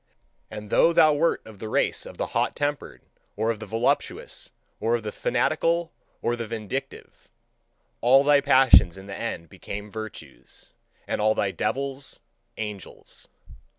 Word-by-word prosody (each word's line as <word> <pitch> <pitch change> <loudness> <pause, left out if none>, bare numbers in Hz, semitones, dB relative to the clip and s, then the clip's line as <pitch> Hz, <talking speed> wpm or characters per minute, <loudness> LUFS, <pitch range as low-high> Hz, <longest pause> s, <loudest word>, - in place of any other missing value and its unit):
And 105 0 -8
though 170 - +5
thou 155 -2 +6
wert 165 +3 +1
of 110 -3 -13
the 110 - -6
race - - 0
of - - -11
the - - -1
hot - - 0
tempered, 145 0 -3 0.3
or 115 +1 +1
of 110 - -5
the 110 - -8
voluptuous, 115 +4 -1 0.3
or 115 +2 +1
of 115 - -3
the 105 - -4
fanatical, 170 +7 0 0.3
or 120 - +1
the 115 -1 -5
vindictive; 110 -3 -6 0.7
All 130 +4 +6
thy 145 0 +5
passions 130 -11 +6
in 95 - -10
the 100 0 -7
end 85 -8 -4
became 105 +5 -8
virtues, 100 - -9 0.4
and - - -1
all 110 +1 +3
thy 100 - 0
devils 135 +4 -3 0.4
angels. 105 -3 -8
115 Hz, 150 wpm, -25 LUFS, 105-140 Hz, 0.7 s, thou